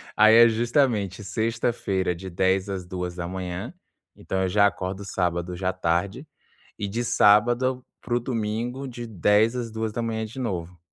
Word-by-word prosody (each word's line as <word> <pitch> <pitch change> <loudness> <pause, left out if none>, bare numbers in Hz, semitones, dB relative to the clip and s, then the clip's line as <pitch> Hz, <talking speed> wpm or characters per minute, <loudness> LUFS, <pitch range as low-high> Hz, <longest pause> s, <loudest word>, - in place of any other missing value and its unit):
Aí, 110 +1 +7
é 120 0 +9
justamente 115 - 0
sexta-feira 105 -2 -1
de 95 +2 -8
22:00 95 +2 +1
às 95 -2 -4
02:00, 90 - -5 0.4
então 95 0 -2
eu 95 - 0
já 100 +2 +5
acordo 95 0 -4
sábado 90 -1 -2
já 95 +1 -1
tarde. 95 - -1 0.5
E 100 - -3
de 115 +5 -2
sábado 120 +4 +3 0.2
para 120 - -4
o - - +2
domingo 120 +2 -3
de 120 -1 -7
22:00 105 +3 +2
às 120 -2 -4
02:00 110 0 -2
de 115 +5 -9
novo. 90 -7 -4
105 Hz, 150 wpm, -25 LUFS, 95-115 Hz, 0.5 s, é